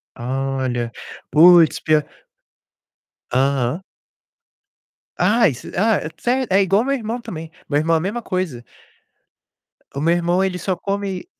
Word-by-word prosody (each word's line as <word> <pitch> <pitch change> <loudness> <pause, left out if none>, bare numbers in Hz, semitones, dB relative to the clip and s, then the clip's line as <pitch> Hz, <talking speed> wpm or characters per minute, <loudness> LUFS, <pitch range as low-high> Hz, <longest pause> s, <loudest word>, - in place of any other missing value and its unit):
Olha. 130 -1 -2 0.4
Puts, 165 +1 +6
pior 155 -1 +2 1.3
aham. 135 +4 0 1.4
Ah, 230 +1 +4
is 130 -7 -4
ah, 215 +3 +2 0.2
sé 255 +2 0
é 195 +1 +4
igual 195 +4 +2
meu 275 - 0
irmão 230 -1 -4
também. 165 -8 -8 0.2
Meu 145 -1 +1
irmão 165 +2 +1
a 160 - +2
mesma 205 +8 -3
coisa. 185 - -3 1.3
O 140 - -3
meu 165 +3 +3
irmão 175 +2 +1
ele 180 -2 -2
só 190 - -1
come 195 - -4
175 Hz, 125 wpm, -20 LUFS, 140-200 Hz, 1.4 s, Puts